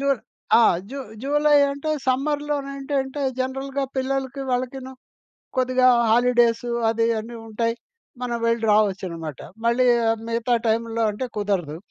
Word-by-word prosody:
జు 275 - -2 0.5
ఆ! - - +6 0.3
జు 280 - -5 0.2
జులై 295 +1 +4
అంటే 285 +2 -3 0.2
సమ్మర్‌లోనేంటంటే, 275 0 -1 0.2
జనరల్‌గా 270 +1 -2
పిల్లలకి, 265 0 -2
వాళ్ళకిను 255 +1 -3 0.7
కొద్దిగా 255 0 +3 0.2
హాలిడేసు 240 0 +3 0.2
అది 225 0 +1
అన్నీ 230 +2 -8
ఉంటాయి. 230 +1 -1 0.5
మనం 240 -1 -2
వెళ్లి 230 0 +1
రావొచ్చనమాట. 185 -7 0 0.3
మళ్ళీ 235 +2 +3 0.2
ఆహ్, 225 0 0
మిగతా 230 +1 +1
టైముల్లో 230 +1 0
అంటే 210 +5 -4
కుదరదు. 185 -7 -1
250 Hz, 115 wpm, -23 LUFS, 230-270 Hz, 0.7 s, ఆ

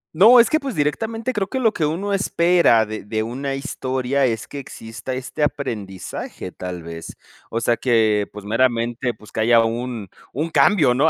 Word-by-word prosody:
No, 225 +9 +8
es 235 - +5
que, 310 - +3
pues, 270 -5 -5
directamente 225 - -1
creo 200 -3 -1
que 260 - -3
lo 225 -4 +3
que 155 -3 0
uno 195 +6 -2
espera 170 - +3
de 110 -1 -6
de 110 +1 -2
una 135 +4 -3
historia 130 0 -1
es 115 -3 -1
que 140 - -7
exista 120 0 -7
este 130 +3 -5
aprendizaje, 105 -11 -4
tal 90 -2 -6
vez. 85 0 -8 0.3
O 115 - -1
sea 115 0 +1
que, 110 -4 +2
pues 105 -1 -10
meramente, 120 +2 0
pues, 105 0 -16
que - - -5
haya 115 +1 +5
un 115 -2 -3 0.2
un 155 +6 -2
cambio, 155 -9 +4
¿no?, 150 +6 +3
125 Hz, 185 wpm, -21 LUFS, 110-160 Hz, 0.3 s, No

